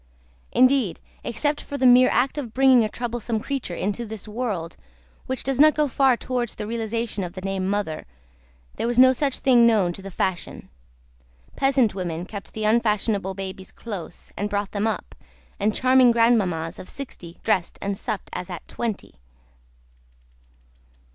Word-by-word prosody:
Indeed, 255 Hz, -7 st, +3 dB, 0.2 s
except 290 Hz, +6 st, -1 dB
for 285 Hz, -, -6 dB
the 260 Hz, -, +1 dB
mere 250 Hz, 0 st, +7 dB
act 265 Hz, +4 st, +1 dB
of 240 Hz, -6 st, -7 dB
bringing 260 Hz, -2 st, +6 dB
a 215 Hz, -, -1 dB
troublesome 235 Hz, -1 st, -3 dB
creature 245 Hz, -7 st, -4 dB
into 205 Hz, +6 st, -2 dB
this 220 Hz, -2 st, -8 dB
world 210 Hz, -7 st, -3 dB, 0.5 s
which 260 Hz, 0 st, -2 dB
does 270 Hz, -1 st, -1 dB
not 305 Hz, +1 st, +7 dB
go 300 Hz, -1 st, +2 dB
far 265 Hz, -1 st, +3 dB
towards 245 Hz, -2 st, -3 dB
the 210 Hz, -, -5 dB
realisation 230 Hz, -1 st, -3 dB
of 175 Hz, -1 st, -6 dB
the 185 Hz, -, -7 dB
name 195 Hz, 0 st, -2 dB
of -, -, -1 dB
mother 200 Hz, -6 st, -2 dB, 0.7 s
there -, -, -1 dB
was 240 Hz, 0 st, -1 dB
no 260 Hz, +1 st, +8 dB
such 275 Hz, +1 st, -1 dB
thing 240 Hz, -3 st, +5 dB
known 200 Hz, -6 st, +3 dB
to 195 Hz, -, -8 dB
the 195 Hz, -, -7 dB
fashion. 185 Hz, -1 st, -3 dB, 0.9 s
Peasant 270 Hz, -6 st, +2 dB
women 175 Hz, -3 st, -4 dB
kept 200 Hz, 0 st, -9 dB
the 220 Hz, -, -4 dB
unfashionable 210 Hz, -3 st, +1 dB
babies 190 Hz, -1 st, -7 dB
close, 205 Hz, -7 st, -8 dB
and 205 Hz, +1 st, -2 dB
brought 205 Hz, -1 st, -2 dB
them 205 Hz, +1 st, 0 dB
up, 220 Hz, -, -3 dB, 0.5 s
and 210 Hz, +1 st, +1 dB
charming 255 Hz, -1 st, +5 dB
grandmammas 195 Hz, -8 st, +2 dB
of -, -, -10 dB
sixty 175 Hz, -11 st, -8 dB
dressed 190 Hz, -6 st, 0 dB
and 200 Hz, 0 st, -2 dB
supped -, -, -5 dB
as -, -, -5 dB
at -, -, -7 dB
twenty. 230 Hz, -4 st, -4 dB
220 Hz, 165 wpm, -24 LUFS, 195-250 Hz, 0.9 s, no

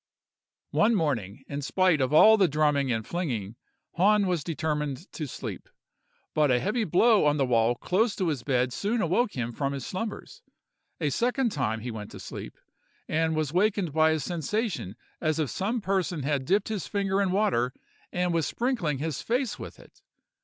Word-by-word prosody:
"One 225 Hz, +2 st, +3 dB
morning, 135 Hz, -, -1 dB
in 140 Hz, 0 st, -4 dB
spite 180 Hz, +1 st, +2 dB
of 130 Hz, -, +1 dB
all 215 Hz, +8 st, +8 dB
the 195 Hz, -4 st, +4 dB
drumming 145 Hz, -3 st, +1 dB
and 110 Hz, -2 st, -1 dB
flinging, 120 Hz, -, -3 dB, 0.4 s
Hahn 205 Hz, +3 st, +4 dB
was 175 Hz, -5 st, 0 dB
determined 150 Hz, -2 st, -2 dB
to 155 Hz, -, -5 dB
sleep; -, -, -7 dB, 0.6 s
but 150 Hz, -2 st, +3 dB
a 125 Hz, -1 st, +3 dB
heavy 215 Hz, -, 0 dB
blow 205 Hz, +1 st, +4 dB
on 150 Hz, 0 st, +2 dB
the 135 Hz, -, +2 dB
wall 120 Hz, -1 st, +2 dB
close 205 Hz, -, +1 dB
to 185 Hz, -4 st, 0 dB
his 145 Hz, -6 st, -2 dB
bed 125 Hz, -1 st, 0 dB
soon 215 Hz, -, -1 dB
awoke 205 Hz, +5 st, +1 dB
him 120 Hz, -2 st, -3 dB
from 140 Hz, +3 st, -2 dB
his 135 Hz, -3 st, -5 dB
slumbers. 200 Hz, +3 st, -5 dB, 0.6 s
A 150 Hz, -4 st, 0 dB
second 245 Hz, -, +1 dB
time 110 Hz, -, -1 dB
he 120 Hz, +2 st, -4 dB
went 105 Hz, -2 st, -7 dB
to -, -, -9 dB
sleep, -, -, -8 dB, 0.5 s
and 160 Hz, 0 st, +1 dB
was 155 Hz, -3 st, -1 dB
awaked 190 Hz, -1 st, +1 dB
by 160 Hz, 0 st, +4 dB
a 160 Hz, 0 st, +1 dB
sensation 170 Hz, -, -2 dB, 0.3 s
as 155 Hz, -1 st, +1 dB
if 155 Hz, -4 st, -1 dB
some 220 Hz, +5 st, -1 dB
person 185 Hz, -6 st, -1 dB
had 140 Hz, -1 st, -1 dB
dipped 195 Hz, +7 st, +1 dB
his 210 Hz, -6 st, -3 dB
finger 200 Hz, -1 st, 0 dB
in 195 Hz, -, +1 dB
water 185 Hz, -, +1 dB, 0.4 s
and 180 Hz, -1 st, 0 dB
was 165 Hz, -3 st, +1 dB
sprinkling 230 Hz, -, -1 dB
his 155 Hz, 0 st, -3 dB
face 245 Hz, 0 st, -1 dB
with -, -, -9 dB
it. -, -, -19 dB
160 Hz, 180 wpm, -27 LUFS, 140-200 Hz, 0.6 s, all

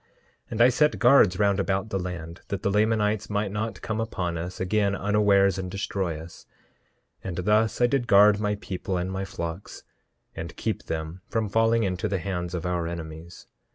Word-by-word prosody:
10:2 -, -, -38 dB, 0.4 s
And 115 Hz, -, -1 dB
I 125 Hz, -, +7 dB
set 150 Hz, +4 st, +2 dB
guards 120 Hz, -7 st, +5 dB
round 100 Hz, -1 st, +2 dB
about 100 Hz, +2 st, -1 dB
the 95 Hz, -, 0 dB
land, 85 Hz, -2 st, -6 dB
that 100 Hz, -2 st, -4 dB
the 100 Hz, -, +1 dB
Lamanites 105 Hz, 0 st, +1 dB
might 105 Hz, -1 st, -1 dB
not 110 Hz, +2 st, -4 dB
come 110 Hz, 0 st, -2 dB
upon 90 Hz, -6 st, -3 dB
us 90 Hz, +2 st, -5 dB
again 100 Hz, +1 st, +1 dB
unawares 100 Hz, -2 st, +3 dB
and 95 Hz, -1 st, -4 dB
destroy 95 Hz, -4 st, -3 dB
us; 80 Hz, +2 st, -12 dB, 0.8 s
and 90 Hz, -3 st, -5 dB
thus 105 Hz, +4 st, +2 dB
I -, -, +6 dB
did 120 Hz, -1 st, 0 dB
guard 105 Hz, 0 st, +6 dB
my 105 Hz, -1 st, 0 dB
people 95 Hz, -1 st, -4 dB
and 90 Hz, +1 st, -2 dB
my 95 Hz, +1 st, -3 dB
flocks, 85 Hz, 0 st, -6 dB, 0.5 s
and -, -, -6 dB
keep -, -, -3 dB
them 80 Hz, +3 st, -4 dB
from 110 Hz, -2 st, -1 dB
falling 115 Hz, +2 st, +3 dB
into 90 Hz, -2 st, -1 dB
the 100 Hz, -, -1 dB
hands 90 Hz, -1 st, -3 dB
of 85 Hz, -, -4 dB
our 90 Hz, -2 st, -1 dB
enemies. 85 Hz, 0 st, -8 dB
100 Hz, 190 wpm, -26 LUFS, 90-105 Hz, 0.8 s, I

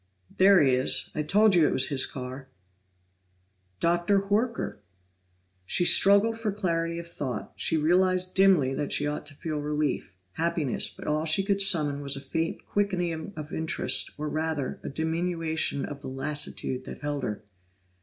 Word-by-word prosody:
"There 190 Hz, -2 st, +6 dB
he 135 Hz, -2 st, +3 dB
is! 130 Hz, +1 st, +2 dB
I 155 Hz, -, -2 dB
told 205 Hz, +7 st, +4 dB
you 165 Hz, -4 st, +5 dB
it -, -, 0 dB
was 130 Hz, 0 st, +3 dB
his 135 Hz, -2 st, +3 dB
car." 130 Hz, +1 st, -8 dB, 1.3 s
Dr. 175 Hz, +4 st, +1 dB
Horker! 225 Hz, -, -1 dB, 0.9 s
She 175 Hz, -, +2 dB
struggled 200 Hz, +5 st, +4 dB
for 220 Hz, -2 st, -1 dB
clarity 170 Hz, -4 st, -2 dB
of 170 Hz, -, -6 dB
thought; 140 Hz, -6 st, -6 dB
she 165 Hz, -, +1 dB
realized 185 Hz, +3 st, +2 dB
dimly 185 Hz, -9 st, +4 dB
that 145 Hz, -, -3 dB
she 145 Hz, -, +1 dB
ought 150 Hz, 0 st, -4 dB
to 145 Hz, -, -6 dB
feel 155 Hz, +1 st, -4 dB
relief, 150 Hz, -9 st, -2 dB, 0.2 s
happiness 165 Hz, -, -1 dB
but -, -, -12 dB
all 155 Hz, +1 st, 0 dB
she 160 Hz, +5 st, +3 dB
could 200 Hz, 0 st, +1 dB
summon 155 Hz, -8 st, +2 dB
was 140 Hz, -1 st, -1 dB
a -, -, -5 dB
faint 160 Hz, +4 st, -3 dB
quickening 180 Hz, -5 st, -2 dB
of 155 Hz, -1 st, -8 dB
interest, 160 Hz, +1 st, +1 dB
or 150 Hz, +1 st, -4 dB
rather, 155 Hz, -3 st, -3 dB
a -, -, -5 dB
diminution 160 Hz, -1 st, -1 dB
of 145 Hz, -1 st, -8 dB
the -, -, -8 dB
lassitude 135 Hz, -1 st, -4 dB
that -, -, -9 dB
held 145 Hz, -1 st, -3 dB
her. 110 Hz, -4 st, -4 dB
160 Hz, 165 wpm, -27 LUFS, 145-185 Hz, 1.3 s, There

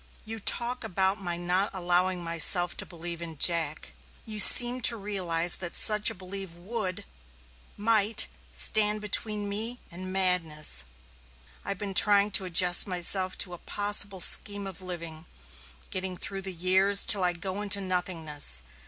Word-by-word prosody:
"You 225 Hz, +1 st, -8 dB
talk 240 Hz, +4 st, +2 dB
about 190 Hz, -1 st, -2 dB
my 175 Hz, -2 st, -5 dB
not 180 Hz, +3 st, -1 dB
allowing 180 Hz, 0 st, -2 dB
myself 170 Hz, +1 st, +1 dB
to -, -, -5 dB
believe 170 Hz, -1 st, -8 dB
in 165 Hz, -2 st, -9 dB
Jack. 160 Hz, -1 st, +1 dB, 0.3 s
You 215 Hz, -2 st, -7 dB
seem 240 Hz, +4 st, +8 dB
not 255 Hz, -, -1 dB
to 230 Hz, -, +3 dB
realize 180 Hz, -5 st, -2 dB
that 175 Hz, -2 st, -6 dB
such 210 Hz, 0 st, +3 dB
a 225 Hz, -, -9 dB
belief 190 Hz, -1 st, -10 dB
would 185 Hz, +1 st, -6 dB, 0.7 s
might 215 Hz, 0 st, 0 dB, 0.3 s
stand 210 Hz, 0 st, +1 dB
between 210 Hz, 0 st, -3 dB
me 225 Hz, +5 st, -5 dB
and 185 Hz, +2 st, -10 dB
madness. 165 Hz, -, +3 dB, 0.8 s
I've 200 Hz, 0 st, -6 dB
been 200 Hz, 0 st, -7 dB
trying 205 Hz, +1 st, +3 dB
to 190 Hz, -1 st, +2 dB
adjust 180 Hz, +1 st, +4 dB
myself 185 Hz, +1 st, +1 dB
to 180 Hz, -, -14 dB
a 175 Hz, -, -11 dB
possible 205 Hz, -2 st, -1 dB
scheme 205 Hz, +3 st, +3 dB
of 190 Hz, -1 st, -10 dB
living 170 Hz, -3 st, -9 dB, 0.6 s
getting 185 Hz, -1 st, -5 dB
through 195 Hz, +1 st, -8 dB
the 190 Hz, 0 st, -8 dB
years 190 Hz, +3 st, +3 dB
till 200 Hz, -4 st, +3 dB
I 180 Hz, -1 st, 0 dB
go 190 Hz, +3 st, -7 dB
into 200 Hz, -1 st, -2 dB
nothingness. 165 Hz, -, -2 dB
190 Hz, 155 wpm, -25 LUFS, 175-205 Hz, 0.8 s, seem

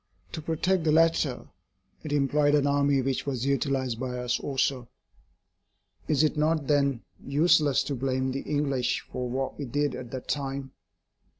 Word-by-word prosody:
To 160 Hz, -, -5 dB
protect 165 Hz, +3 st, 0 dB
the 155 Hz, -, +2 dB
latter 160 Hz, -5 st, +2 dB, 0.6 s
it 155 Hz, -, -5 dB
employed 145 Hz, +1 st, +2 dB
an 145 Hz, -1 st, +2 dB
army 140 Hz, -1 st, +2 dB
which 135 Hz, +1 st, -2 dB
was 130 Hz, -2 st, -2 dB
utilised 135 Hz, -3 st, 0 dB
by 125 Hz, -1 st, -3 dB
us 125 Hz, 0 st, -1 dB
also. 130 Hz, -3 st, -1 dB, 1.2 s
Is 155 Hz, -1 st, +2 dB
it 155 Hz, -, +2 dB
not 155 Hz, 0 st, +1 dB
then 140 Hz, -4 st, +1 dB, 0.2 s
useless 150 Hz, 0 st, +3 dB
to 145 Hz, -, -3 dB
blame 130 Hz, 0 st, -1 dB
the 135 Hz, +1 st, -3 dB
English 140 Hz, -4 st, -1 dB
for 125 Hz, -1 st, -3 dB
what 130 Hz, +3 st, -3 dB
we 145 Hz, -, -3 dB
did 145 Hz, +2 st, -1 dB
at 125 Hz, -, -7 dB
that 130 Hz, 0 st, -7 dB
time? 135 Hz, -1 st, -3 dB
140 Hz, 160 wpm, -27 LUFS, 130-150 Hz, 1.2 s, useless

